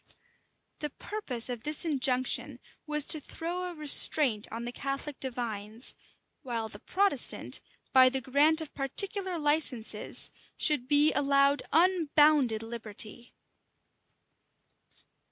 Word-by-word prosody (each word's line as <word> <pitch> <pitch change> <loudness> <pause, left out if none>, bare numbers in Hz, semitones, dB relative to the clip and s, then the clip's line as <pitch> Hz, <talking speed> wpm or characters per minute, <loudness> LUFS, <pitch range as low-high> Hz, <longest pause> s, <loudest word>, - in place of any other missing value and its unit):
The 300 - -4
purpose 275 - -1
of 245 -3 -4
this 300 +5 -2
injunction 255 -4 -1 0.3
was 300 -1 -1
to 310 - +4
throw 345 +5 -6
a 355 -1 -7
restraint 285 -6 +5
on 230 +2 -6
the 240 - -5
Catholic 275 +2 -6
divines; 230 -3 -3 0.5
while 235 -5 -5
the 205 - -12
Protestant, 370 - +1 0.3
by 255 -1 +6
the 265 +1 -2
grant 290 +5 +1
of 315 - -9
particular 375 +7 -1
licenses, 295 -6 0 0.3
should 290 -6 +1
he 295 +1 +4
allowed 280 0 +2
unbounded 300 -8 +2
liberty. 225 +1 -7
275 Hz, 110 wpm, -28 LUFS, 240-310 Hz, 0.5 s, by